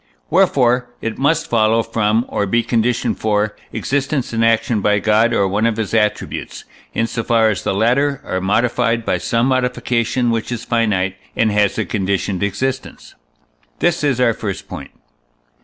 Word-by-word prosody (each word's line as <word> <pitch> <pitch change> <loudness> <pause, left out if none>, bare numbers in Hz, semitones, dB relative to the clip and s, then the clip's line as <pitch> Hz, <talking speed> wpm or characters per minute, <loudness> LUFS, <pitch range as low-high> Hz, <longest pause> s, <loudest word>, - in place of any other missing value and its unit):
Wherefore 125 -1 +3
it 115 -1 -4
must 155 +4 +1
follow 115 0 +2
from, 110 +2 0
or 100 - -1
be 115 +4 +1
conditioned 120 +1 0
for, 105 -1 0 0.2
existence 135 -2 -2
and 115 0 +1
action 115 -1 +2
by 105 +1 +2
God 110 +3 +3
or 100 - +2
one 105 +4 +1
of 115 -1 -1
his 110 -2 -3
attributes, 105 -2 -1 0.3
in 115 - +1
so 115 0 -3
far 115 -1 +3
as 105 - -4
the - - 0
latter 130 +6 +2
are 95 0 -2
modified 115 +3 +1
by - - 0
some 115 +1 0
modification 125 -2 0
which 115 +1 -2
is 120 -2 -4
finite, 100 -5 0 0.2
and 110 -1 +2
has 105 -1 +1
a - - 0
conditioned 95 -1 -1
existence. 130 +7 -3 0.6
This 175 -2 +1
is 140 -4 +1
our 120 -2 +3
first 100 -3 -5
point. - - -8
115 Hz, 165 wpm, -18 LUFS, 105-125 Hz, 0.6 s, Wherefore